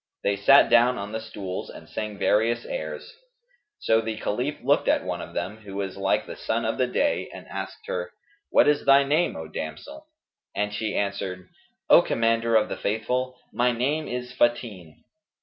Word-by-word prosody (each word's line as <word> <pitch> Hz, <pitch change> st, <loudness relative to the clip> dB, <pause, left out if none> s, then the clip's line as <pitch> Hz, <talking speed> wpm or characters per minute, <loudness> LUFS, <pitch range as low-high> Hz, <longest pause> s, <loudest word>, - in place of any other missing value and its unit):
They 100 Hz, -, +2 dB
sat 135 Hz, +8 st, +6 dB
down 120 Hz, +1 st, +5 dB
on 100 Hz, +1 st, -5 dB
the 110 Hz, -, -3 dB
stools 95 Hz, -4 st, -6 dB
and -, -, -11 dB
sang 105 Hz, -1 st, -5 dB
various 115 Hz, +4 st, +2 dB
airs; -, -, -6 dB, 0.6 s
so 110 Hz, 0 st, +2 dB
the 110 Hz, -1 st, -4 dB
Caliph 125 Hz, +8 st, -2 dB
looked 140 Hz, +3 st, +2 dB
at -, -, +3 dB
one -, -, -3 dB
of -, -, -10 dB
them, 105 Hz, +3 st, -3 dB
who 105 Hz, -3 st, -11 dB
was 100 Hz, -1 st, -3 dB
like 95 Hz, 0 st, 0 dB
the -, -, -8 dB
sun 115 Hz, +1 st, -2 dB
of 110 Hz, +4 st, -2 dB
the 130 Hz, -, +3 dB
day, 290 Hz, -, 0 dB
and -, -, -10 dB
asked 435 Hz, -, -7 dB
her, -, -, -4 dB, 0.4 s
"What -, -, +5 dB
is 150 Hz, 0 st, +3 dB
thy 140 Hz, 0 st, +7 dB
name, 150 Hz, +5 st, +1 dB
O 80 Hz, -1 st, -6 dB
damsel?"; 295 Hz, -, -7 dB, 0.5 s
and 105 Hz, 0 st, -1 dB
she 105 Hz, 0 st, -2 dB
answered, 100 Hz, -2 st, -3 dB, 0.4 s
"O -, -, +8 dB
Commander 115 Hz, 0 st, +1 dB
of 110 Hz, -1 st, +4 dB
the -, -, -5 dB
Faithful, 125 Hz, +4 st, -2 dB, 0.2 s
my 125 Hz, +1 st, +2 dB
name 145 Hz, +7 st, -1 dB
is 125 Hz, 0 st, -5 dB
Fαtin." 110 Hz, -10 st, -1 dB
115 Hz, 185 wpm, -25 LUFS, 100-130 Hz, 0.6 s, O